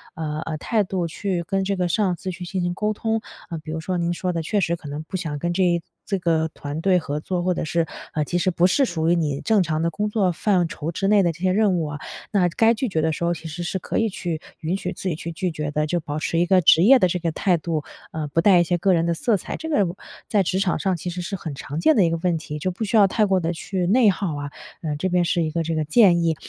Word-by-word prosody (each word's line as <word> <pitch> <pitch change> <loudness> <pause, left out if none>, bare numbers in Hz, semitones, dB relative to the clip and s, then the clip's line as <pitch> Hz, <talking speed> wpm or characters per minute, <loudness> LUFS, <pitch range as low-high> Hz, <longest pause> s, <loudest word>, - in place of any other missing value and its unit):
呃 155 -2 -3
呃， 155 -1 -3
态 215 +7 +1
度 185 -2 -2
去 180 +1 -2
跟 195 +2 -1
这 195 +1 -1
个 180 -1 0
上 185 0 +1
司 185 +3 -6
去 180 0 -7
进 185 +1 -3
行 175 0 -1
沟 210 +3 0
通。 225 +1 -1 0.3
呃， 165 - -4
比 155 0 -8
如 160 - -3
说 180 +3 -2
您 170 0 0
说 180 +1 -2
的 165 -2 -2
确 205 +6 0
实 170 0 +1
可 160 -3 -11
能 145 +2 -5
不 185 +4 -5
想 155 -5 -4
跟 175 +3 -1
这 175 -2 +2 0.2
这 195 - -1
个 165 -2 +1
团 145 +2 -5
队 190 0 +4
合 150 -2 -3
作， 180 +3 -2
或 185 - +2
者 165 - -3
是， 165 +1 0 0.3
呃， 150 - 0
其 175 - -1
实 185 - +2
不 170 0 +2
是 275 +9 +3
属 165 -9 0
于 175 - +4
你 150 -4 -1
正 215 -3 +3
常 155 -1 -1
的 170 - +2
工 210 +6 -2
作 200 -4 +1
范 180 -1 +1
畴 155 +1 -5
之 195 +3 -1
内 205 0 +5
的 170 - +2
这 160 - -13
些 185 - +3
任 200 -1 +3
务 165 - -1
啊， 150 -1 -5 0.3
那 185 -4 +3
该 225 +7 +3
拒 245 +3 -2
绝 160 -5 0
的 160 0 +1
时 170 - -4
候， 170 - +2
其 165 -1 -8
实 160 +2 -6
是 175 - -2
可 - - -3
以 225 - +1
去 170 -4 -4 0.2
允 165 +4 -1
许 180 -2 -3
自 190 - -6
己 165 - -1
去 165 +2 -6
拒 180 +2 -2
绝 150 -2 -3
的。 150 +1 0
就 175 +2 0
保 150 -1 -5
持 165 +2 -1
一 175 - +3
个 185 0 +5
职 160 - +6
业 265 +7 +8
的 185 - +4
这 180 +1 -1
个 165 -1 -1
态 180 +2 +1
度， 160 -2 -2 0.3
呃， 155 -1 -3
不 155 +3 +1
带 185 0 +6
一 - - +5
些 175 +1 0
个 185 +2 +2
人 165 0 +2
的 170 - +1
色 210 +5 +1
彩， - - -6
这 320 - -6
个 210 -11 +3
我 175 +2 -5 0.3
在 210 - +2
职 185 +2 0
场 195 -3 +1
上 190 -2 0
其 180 - -5
实 180 - -5
是 195 +3 -4
很 160 -4 -6
常 145 +3 -5
见 315 - +4
的 210 - +5
一 170 - +3
个 165 - 0
问 175 -2 +2
题， 150 -1 -6
就 185 - -1
不 190 +5 -5
需 215 +1 -1
要 205 - +7
太 215 +3 +2
过 190 -1 +2
地 165 -1 -1
去 180 +2 -3
内 225 +2 +5
耗 185 -5 -1
啊。 145 0 -5 0.3
呃， 155 -4 -2
这 185 +5 -1
边 180 -1 +2
是 175 0 +1
一 155 - -1
个 165 +1 -1
这 165 0 -2
个 155 - 0
建 175 -2 +5
议。 165 -1 +2
175 Hz, 325 characters per minute, -23 LUFS, 160-190 Hz, 0.3 s, 业